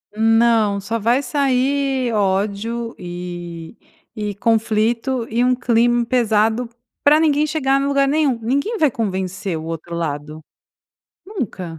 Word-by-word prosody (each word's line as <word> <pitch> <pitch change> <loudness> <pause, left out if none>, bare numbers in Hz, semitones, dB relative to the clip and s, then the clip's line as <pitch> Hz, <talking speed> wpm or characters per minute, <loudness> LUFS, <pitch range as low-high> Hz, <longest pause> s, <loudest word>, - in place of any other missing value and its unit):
Não. 225 -2 +3
Só 210 +4 -3
vai 240 +6 +2
sair 270 -2 0
ódio, 210 +3 -1
eh, 175 -1 -7 0.4
e 210 -3 -4
conflito 230 +2 0
e 235 +2 +1
um 250 0 +3
clima 240 0 +2
pesado 230 -1 +1 0.4
pra 300 +2 +6
ninguém 305 -1 +3
chegar 275 -3 +1
no 275 - 0
lugar 275 -1 +2
nenhum. 285 -4 +1
Ninguém 280 - -1
vai 310 -6 +3
convencer 190 -6 -3
o 155 - -7
outro 165 +1 -6
lado. 155 -1 -4 0.8
Nunca. 190 - -5
230 Hz, 125 wpm, -20 LUFS, 195-265 Hz, 0.8 s, pra